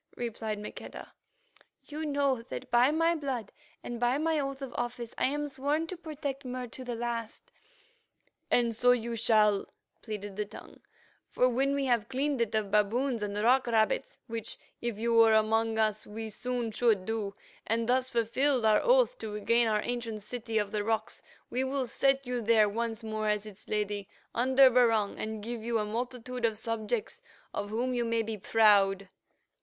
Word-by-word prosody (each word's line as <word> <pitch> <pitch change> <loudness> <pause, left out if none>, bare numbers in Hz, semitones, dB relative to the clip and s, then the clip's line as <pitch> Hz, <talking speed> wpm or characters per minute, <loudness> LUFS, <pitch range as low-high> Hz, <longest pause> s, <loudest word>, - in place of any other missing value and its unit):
replied 225 -2 -3
Maqueda. 210 - -9 0.7
"You 305 +1 -5
know 280 -4 +1
that - - -7
by 245 +2 +5
my 330 +2 +2
blood 270 - -3 0.3
and 240 -1 -5
by 245 +2 +2
my 315 0 +1
oath 275 -1 -3
of 270 - -6
office 240 -1 -4
I - - +1
am 295 +2 -1
sworn 290 +3 -1
to 370 - -6
protect 300 -5 -5
Mur 255 0 -4
to 255 - -8
the 245 -1 -4
last." 230 -1 -5 1.0
"And 235 -2 +2
so 245 +2 +5
you 235 -1 -2
shall," 215 -3 +3 0.3
pleaded 205 -3 -6
the 210 - -1
Tongue, - - -12 0.5
"for 250 - +3
when 270 +3 +1
we 280 -1 0
have 235 -4 +1
cleaned 270 0 0
it 230 -2 0
of 210 -2 -1
baboons 230 +4 +1
and 205 0 -3
rock 255 +2 +4
rabbits, 220 -2 +1
which, 230 -1 -5 0.2
if 235 -3 -2
you 230 +2 0
were 225 -1 +6
among 220 +1 +2
us, 215 -1 0
we 220 +1 -6
soon 245 +1 -3
should 215 -4 +2
do, 210 -2 -3 0.3
and 225 +1 0
thus 255 +1 +2
fulfilled 245 +2 +1
our 215 -1 +5
oath - - +3
to 215 - -5
regain 230 +3 +2
our 210 -1 +1
ancient 230 -4 -3
secret 240 +2 -6
City 225 -1 0
of 205 -2 0
the 210 -1 -1
Rocks, 220 +1 -2 0.3
we 255 +2 0
will 265 0 -1
set 270 +3 +1
you 245 -1 -2
there 220 -1 +4
once 225 +2 -3
more 215 -1 -2
as 210 0 0
its 210 -2 -12
Lady, 205 -1 -2 0.2
under 260 +2 +5
Barung, 225 -4 +3
and 215 -1 -4
give 235 +1 -4
you 230 +1 0
a 210 - 0
multitude 245 +2 -4
of 225 -2 +1
subjects 230 - -3 0.3
of 205 - -3
whom 245 +4 -1
you 240 -1 0
may 230 -1 0
be 220 0 -4
proud." 200 -2 +4
230 Hz, 180 wpm, -30 LUFS, 215-255 Hz, 1.0 s, were